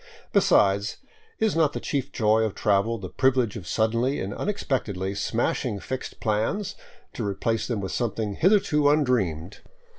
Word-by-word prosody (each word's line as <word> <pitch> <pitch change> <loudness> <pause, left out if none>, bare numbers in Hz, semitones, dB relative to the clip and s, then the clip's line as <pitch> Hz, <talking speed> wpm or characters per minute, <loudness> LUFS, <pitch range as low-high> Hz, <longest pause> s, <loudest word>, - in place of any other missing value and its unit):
Besides, 100 +2 +3 0.4
is 220 -5 +1
not 155 -3 +3
the - - -3
chief 140 -1 -3
joy 110 -1 +2
of 110 -3 -1
travel 105 +3 +1
the 95 - -6
privilege 125 +1 +1
of 95 -8 -7
suddenly 115 - +1
and 95 +2 -3
unexpectedly 105 - -2
smashing 100 0 -1
fixed 130 +6 -6
plans, 110 - -1 0.4
to - - -4
replace 105 +3 -1
them 115 -5 -2
with 95 - -4
something 110 -3 -2
hitherto 155 - +3
undreamed? 110 - 0
110 Hz, 145 wpm, -25 LUFS, 100-135 Hz, 0.4 s, Besides